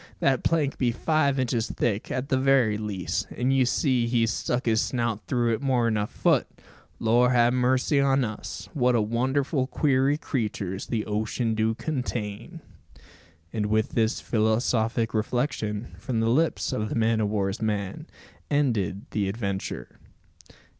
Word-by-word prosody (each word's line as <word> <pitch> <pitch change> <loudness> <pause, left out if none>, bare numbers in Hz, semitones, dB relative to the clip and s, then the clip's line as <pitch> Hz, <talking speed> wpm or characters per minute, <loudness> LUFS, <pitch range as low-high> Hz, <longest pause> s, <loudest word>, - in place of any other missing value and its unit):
That 135 -1 +2
plank 155 -4 +1
be 125 -2 +2
five 140 +2 +1
inches 120 -3 0
thick, 110 -3 -1
at 130 +2 -3
the 130 - +2
very 130 -5 +3
least, 100 -4 -3
an' 125 +2 +1
you 130 -2 +3
see 125 -3 +1
he's 115 -2 +1
stuck 120 +1 -2
his 110 -2 +3
snout 115 -4 -2
through 120 -2 +1
it 110 - -2
more'n 120 -5 +1
a 105 0 0
foot! - - +1 0.5
Lor 120 +4 +3
'a 120 0 +5
mercy 130 +3 +2
on 135 -1 +3
us! 110 -3 -6
What 125 -5 +2
wonderful 130 +3 0
queery 135 0 +2
creeturs 105 - -3
the 110 -3 -2
ocean 110 +2 -1
do 110 0 +1
contain!" 125 - -4 0.9
And 105 -2 -1
with 110 +1 +1
this 110 -1 0
philosophic 115 +1 +1
reflection, 110 -1 -2
from 125 -5 -2
the 115 0 +1
lips 155 +2 +1
of 110 -4 -2
the - - -3
man 115 -1 +2
o' 105 - +1
war's 100 -1 -1
man, 105 - -2 0.4
ended 115 - 0
the 100 -3 0
adventure. 100 -2 -4
120 Hz, 150 wpm, -26 LUFS, 110-130 Hz, 0.9 s, a